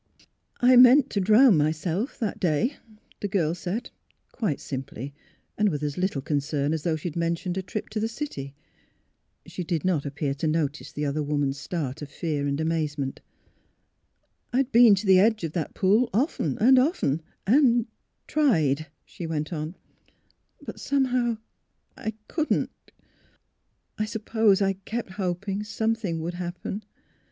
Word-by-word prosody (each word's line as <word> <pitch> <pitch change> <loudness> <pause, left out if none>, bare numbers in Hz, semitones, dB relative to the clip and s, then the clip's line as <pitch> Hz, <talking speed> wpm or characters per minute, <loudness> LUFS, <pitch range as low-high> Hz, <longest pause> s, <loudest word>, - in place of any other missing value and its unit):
" - - -35
I 250 0 +6
meant 255 +3 +7
to 200 - 0
drown 215 +1 +6
myself 160 - -1
that 220 -4 -3
day," 185 - +1 0.4
the 205 - -2
girl 170 -5 +1
said, 185 +7 -4 0.4
quite 200 - -2
simply, 135 0 -6 0.5
and 210 -1 +4
with 150 -4 -3
as 145 -1 -2
little 180 -7 -1
concern 145 0 -1
as 160 - -2
though 160 +1 0
she 160 +3 -4
had 150 - -12
mentioned 170 +1 -1
a 190 - -1
trip 205 +3 -5
to 215 0 -3
the 220 - 0
city. 225 - -6 0.9
She 180 - -6
did 170 -2 -2
not 170 -6 +1
appear 140 0 -2
to 140 +3 -2
notice 155 -2 -1
the 150 - -3
other 145 +2 -1
woman's 145 -2 -1
start 150 -2 -4
of 145 - -6
fear 145 -2 -2
and 140 +1 -1
amazement. 155 -4 -2 0.7
'' - - -47
I - - +2
had 270 0 +1
been 230 -3 +7
to 195 - -4
the 190 -1 +6
edge 215 0 +3
of 165 - -2
that 165 -4 -3
pool 210 +6 +3
often 215 - 0
and 255 +4 +6
often 255 - +1 0.2
and 240 0 +4 0.2
— - - -51
tried," 160 - +2 0.2
she 170 - -7
went 155 +1 -3
on; 155 +2 -4 0.5
" - - -40
but - - -7
some 280 -1 +1
how 245 -2 0 0.6
I 220 0 -5
— - - -45
couldn't. 315 -2 0 1.3
I 215 - +1
suppose 215 -2 +2
I 195 0 +2
kept 200 +2 -5
hoping 195 +1 -2
some 220 +1 0
thing 185 -8 -3
would 170 +2 -3
happen. 180 +4 -5
180 Hz, 170 wpm, -26 LUFS, 150-220 Hz, 1.3 s, meant